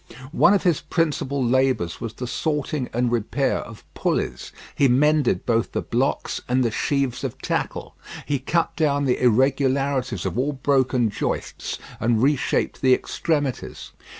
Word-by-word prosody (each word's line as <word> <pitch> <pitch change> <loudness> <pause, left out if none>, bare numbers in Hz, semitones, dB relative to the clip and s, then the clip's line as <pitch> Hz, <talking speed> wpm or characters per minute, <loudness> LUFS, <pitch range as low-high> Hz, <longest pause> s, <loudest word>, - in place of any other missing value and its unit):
One 185 +3 +5
of 200 - 0
his 175 -5 +2
principal 145 -5 -1
labours 130 -9 +1
was 115 -2 -4
the 125 - -6
sorting 150 0 -2
and 120 +1 0
repair 120 +4 0
of 115 -2 -10
pulleys. - - -2 0.2
He 140 - +3
mended 140 -5 +2
both 115 -1 0
the - - -1
blocks - - -1
and 130 +1 +2
the 115 - +1
sheaves 135 +2 -1
of - - -4
tackle. - - -3 0.3
He 145 -2 -1
cut 165 +5 0
down 145 -3 +1
the 125 - +1
irregularities 130 - +1
of 120 - -2
all 145 +3 0
broken 130 -4 +1
joists, - - -3 0.2
and 115 0 +1
reshaped 140 -1 +1
the 130 -1 +5
extremities. 145 -4 -3
130 Hz, 150 wpm, -23 LUFS, 120-145 Hz, 0.3 s, One